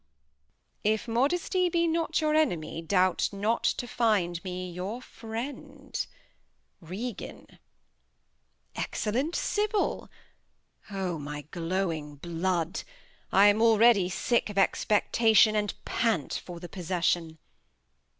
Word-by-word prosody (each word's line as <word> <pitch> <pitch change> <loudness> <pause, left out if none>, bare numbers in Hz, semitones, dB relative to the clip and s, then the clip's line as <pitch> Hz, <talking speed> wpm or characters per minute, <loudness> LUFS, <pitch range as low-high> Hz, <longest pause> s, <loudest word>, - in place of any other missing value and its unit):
If 215 +2 +1
Modesty 345 +9 +1
be 340 0 +2
not 330 -1 0
your 305 -1 +2
Enemy, 175 - 0
doubt 185 +2 +2
not 210 +3 0
to - - +1
[Reads. 240 - -11
Find 185 -7 +1
me 180 -1 -5
your 185 +7 -4
Friend. 270 +4 -6 0.7
Regan. 195 +6 -6 1.3
Excellent 260 +10 -1
Sybil.' 420 0 0 0.8
O 190 -5 -3
my 145 0 -5
glowing 165 -4 -2
Blood! 170 +2 -2 0.5
I 195 +1 +6
am 205 +1 +5
already 225 -4 +5
sick 235 +4 0
of 205 - -7
Expectation, 215 +2 +4
And 210 -1 0
pant 225 - 0
for 175 -2 -6
the 175 - -8
Possession. 175 -2 -1
205 Hz, 105 wpm, -28 LUFS, 175-240 Hz, 1.3 s, I